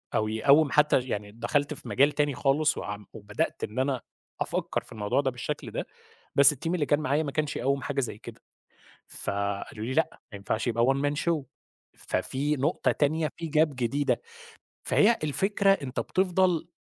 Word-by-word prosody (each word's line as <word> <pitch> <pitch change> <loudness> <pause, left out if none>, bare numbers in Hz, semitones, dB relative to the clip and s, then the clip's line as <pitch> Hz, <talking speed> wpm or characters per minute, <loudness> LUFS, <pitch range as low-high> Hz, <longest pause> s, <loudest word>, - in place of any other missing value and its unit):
أو 110 - +2
يقوِّم 140 +7 +4
حتّى 150 -2 +4
يعني 105 -5 -4
دخلت 140 +7 -1
في - - -11
مجال 140 +3 +4
تاني 145 -3 0
خالص 150 +4 +2
وعم 105 0 -5
وبدأت 105 -1 -3
إن 110 +5 -3
أنا 130 -1 0 0.4
أفكَّر - - -1
في - - -19
الموضوع 110 +3 0
ده 135 -2 0
بالشكل 120 -1 -5
ده، - - -4 0.5
بس 140 +1 +7
الteam 165 +5 -3
اللي 155 -5 +1
كان 145 +2 +2
معايا 150 +1 +1
ما 140 - -4
كانش 150 0 -1
يقوِّم 140 +1 0
حاجة 140 0 -2
زي 120 -5 -4
كده. - - -11 0.7
فقالوا 100 +2 -3
لي: 125 - -3
"لأ 160 +1 +3 0.2
ما 100 - -6
ينفعش 105 +4 -2
يبقى 115 -1 +2
one 135 - +3
man - - -3
show" 165 -3 +1 0.5
ففي 145 +3 -1
نقطة 145 +6 +1
تانية، 155 +2 +1
في 165 - -5
gap 155 -1 +3
جديدة. 130 +4 0 0.6
فهي 230 +3 +4
الفكرة 195 +7 +1
أنت 135 -8 -4
بتفضل 185 -3 +1
140 Hz, 175 wpm, -27 LUFS, 120-155 Hz, 0.7 s, بس